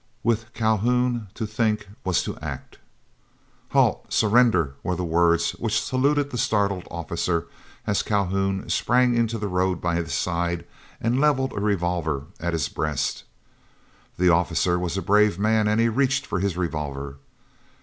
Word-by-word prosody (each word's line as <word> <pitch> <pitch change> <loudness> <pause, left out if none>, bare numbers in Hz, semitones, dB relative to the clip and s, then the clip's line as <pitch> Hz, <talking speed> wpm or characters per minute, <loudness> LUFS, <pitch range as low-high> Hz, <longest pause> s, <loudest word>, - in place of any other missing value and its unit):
With 115 0 0
Calhoun 115 +1 +1
to 110 - -3
think 110 -1 -1 0.2
was 95 -2 +1
to - - -4
act. - - -7 0.9
"Halt! - - +2
Surrender!" 110 - +3
were 90 - -1
the 90 - -3
words 85 0 +2
which 110 -1 -1
saluted 140 +2 +1
the 120 - -3
startled 100 -4 0
officer, 85 0 -2 0.4
as 100 - +1
Calhoun 95 -1 -1
sprang 125 0 +2
into 115 -1 +1
the 105 -1 -3
road 90 0 0
by 85 -1 -1
his 85 -3 -2
side, 85 +3 -1 0.3
and 120 +4 +1
levelled 135 -3 +2
a - - -3
revolver 85 -8 -1 0.2
at 85 0 -2
his 80 -4 0
breast. 75 0 -2 0.9
The 90 0 +4
officer 90 +1 +2
was 90 +1 -2
a 95 - -2
brave 105 -1 +3
man, 110 +1 +2
and 105 +1 +2
he 115 - +4
reached 135 +4 +1
for - - -2
his 95 -2 -1
revolver. 70 -5 -4
100 Hz, 150 wpm, -24 LUFS, 85-115 Hz, 0.9 s, The